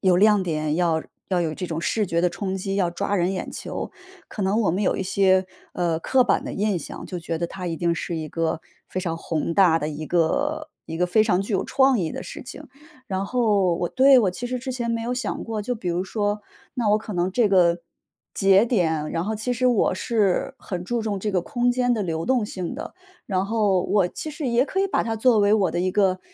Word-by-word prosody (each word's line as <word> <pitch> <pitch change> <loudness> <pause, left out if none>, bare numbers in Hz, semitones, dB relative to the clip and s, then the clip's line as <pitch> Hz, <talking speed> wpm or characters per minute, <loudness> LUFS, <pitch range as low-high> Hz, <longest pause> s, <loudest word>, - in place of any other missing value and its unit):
有 185 -3 +4
亮 210 +1 +5
点， 155 -3 -1
要 165 -2 +1 0.3
要 185 -2 +1
有 160 -2 -1
这 185 - -5
种 165 -1 -3
视 210 +5 0
觉 170 -1 0
的 180 - +3
冲 190 +2 -4
击， 195 +1 -3
要 185 -3 +1
抓 200 +3 -2
人 180 -1 +1
眼 185 - -4
球， - - -5 0.4
可 210 - -5
能 200 +4 +2
我 195 - +2
们 185 +5 -1
有 - - +1
一 - - -2
些， 190 0 +3 0.3
呃， 170 -2 0
刻 255 +7 +3
板 220 - +1
的 - - -5
印 205 -1 0
象， 155 - -7
就 180 - -5
觉 165 0 -3
得 170 - -1
它 180 +1 -7
一 165 - -3
定 170 0 +1
是 170 +1 -4
一 155 -1 -4
个 165 0 -1 0.3
非 185 - -3
常 170 -3 -2
宏 165 0 -2
大 175 -4 +5
的 150 - -3
一 155 0 -5
个 285 - 0 0.2
一 160 - -5
个 180 +2 +1
非 215 +5 +4
常 200 -4 +2
具 200 +3 -4
有 190 - +1
创 265 -1 +3
意 165 -3 -1
的 - - -5
事 - - -8
情。 270 +4 -9 0.4
然 195 -3 -2
后 205 -7 +2
我 175 - -1
对， 265 +4 +6
我 205 -6 +3
其 185 +7 -6
实 255 - -2
之 260 +2 -5
前 240 -2 -2
没 230 0 -1
有 240 +2 -2
想 250 - -3
过， 220 -2 -3
就 245 +4 -2
比 200 -5 -4
如 175 +1 0
说， 205 +1 -2 0.3
那 235 -4 0
我 210 - +4
可 215 -1 -7
能 180 +1 0
这 225 0 +3
个， 175 -3 +4 0.6
节 195 +3 +5
点 160 -10 0
然 165 +1 -2
后 220 +1 -2
其 220 +4 -2
实 255 +2 +1
我 235 -6 +3
是 210 +3 0
很 180 -6 -5
注 240 +4 -1
重 215 -3 -2
这 210 +2 -2
个 185 - +2
空 245 +7 0
间 245 -1 +2
的 215 - -1
流 165 -3 -3
动 255 -4 +2
性 185 +1 -5
的。 305 - -7 0.3
然 190 0 -1
后 205 -4 +2
我 195 -1 +2
其 310 - -5
实 300 -1 -5
也 240 +1 +3
可 385 - -3
以 390 - +2
把 - - 0
它 225 -1 -2
作 230 0 +4
为 205 0 +4
我 195 -5 +2
的 175 - -1
一 185 +1 +1
个 185 -1 +2
195 Hz, 265 characters per minute, -24 LUFS, 175-225 Hz, 0.6 s, 对